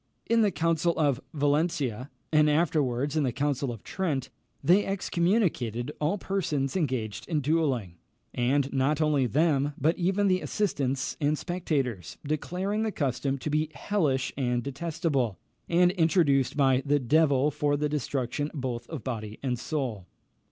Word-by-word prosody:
In 230 0 +3
the 210 - +4
Council 165 -1 +1
of 145 -4 +2
Valentia, 145 -4 0 0.2
and 150 0 +5
afterwards 145 -3 +1
in 155 - +2
the 130 -3 +1
Council 140 0 -1
of 115 -4 -9
Trent, 145 -9 -2 0.3
they 180 +8 +5
excommunicated 170 - 0
all 155 +7 +1
persons 160 -9 -1
engaged 125 - -2
in 160 -3 +1
duelling; 135 - 0 0.4
and 135 +3 +1
not 140 +3 +1
only 150 -4 +2
them, 145 0 +1
but 160 +5 +2
even 190 +3 +2
the 185 -1 +2
assistants 140 -9 -1
and 150 +1 +2
spectators, 140 - -2
declaring 180 +8 -2
the 220 -1 0
custom 135 -3 -1
to 150 +3 -4
be 155 +1 +1
hellish 145 -11 0
and 125 -3 0
detestable, 140 - -1 0.3
and 175 +1 +4
introduced 160 -7 +2
by 135 -2 +4
the 145 0 +2
devil 145 +1 +3
for 145 0 0
the 150 +1 0
destruction 145 -1 -2
both 125 -4 -4
of 160 -8 -6
body 110 -4 -5
and 125 -3 -1
soul. 125 - -3
145 Hz, 145 wpm, -28 LUFS, 130-165 Hz, 0.4 s, and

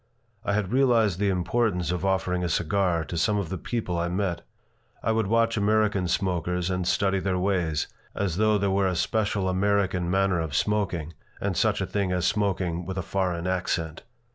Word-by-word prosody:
I 100 - 0
had 105 -2 -1
realized 115 -8 +3
the 100 -1 +2
importance 95 0 0
of 90 0 -2
offering 95 -2 0
a 90 - -1
cigar 85 +1 +1
to 85 - -5
some 105 +6 +2
of 100 -5 -2
the 95 - -3
people 100 -8 -2
I 85 - 0
met. 90 -1 -1 0.6
I 110 - +1
would 110 -2 +1
watch 115 +1 +2
American 105 -2 +2
smokers 90 0 -1
and 90 -1 -1
study 95 0 +2
their 95 -1 -1
ways, 90 -5 0 0.3
as 95 -4 -1
though 110 0 +3
there 100 -1 0
were 95 0 +2
a 90 - 0
special 105 +1 0
American 95 -2 +1
manner 95 -1 +2
of 80 -4 -3
smoking 90 -5 0 0.3
and - - -1
such - - +1
a - - 0
thing 100 -3 -1
as 90 -1 0
smoking 90 -2 0
with 95 +2 -5
a 95 - -1
foreign 90 -3 -1
accent. 90 -3 -1
95 Hz, 190 wpm, -26 LUFS, 90-100 Hz, 0.6 s, realized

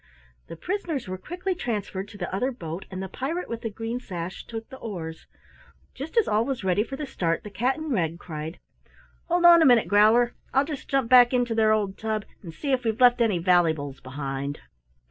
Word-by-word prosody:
The - - -8
prisoners 330 - -3
were 185 0 -5
quickly 360 - -3
transferred 205 - -4
to 205 - -12
the 180 -2 -5
other 255 +7 0
boat, 170 -6 -7
and 190 0 -5
the - - -4
pirate 315 - -4
with 230 -1 -5
the 225 - -3
green 225 +3 -4
sash 180 -5 -6
took 225 -1 -6
the 265 - -10
oars. 165 -7 -7 0.7
Just 290 - -7
as 455 - +4
all 215 +1 +2
was 265 -4 -3
ready 190 +2 +2
for 270 - -7
the 295 - -4
start 170 -10 -1
the 210 - -9
cat 250 +6 0
in 315 -1 -5
red 170 -8 0
cried: 160 -1 -7 0.7
"Hold 350 0 +2
on 340 -1 +9
a - - +6
minute, 245 -3 +5
Growler! 220 +4 +5 0.2
I'll 270 +1 +4
just 295 -3 -7
jump 270 -3 +1
back 245 0 +7
into 245 -2 +1
their 220 -1 +3
old 205 -3 0
tub 220 -1 -2 0.2
to 170 - -8
see 275 - -4
if 260 -1 +1
we've 225 0 -1
left 245 -1 +6
any 220 -6 +3
vallybles 160 -6 +1
behind!" 135 +1 -4
220 Hz, 210 wpm, -26 LUFS, 180-260 Hz, 0.7 s, on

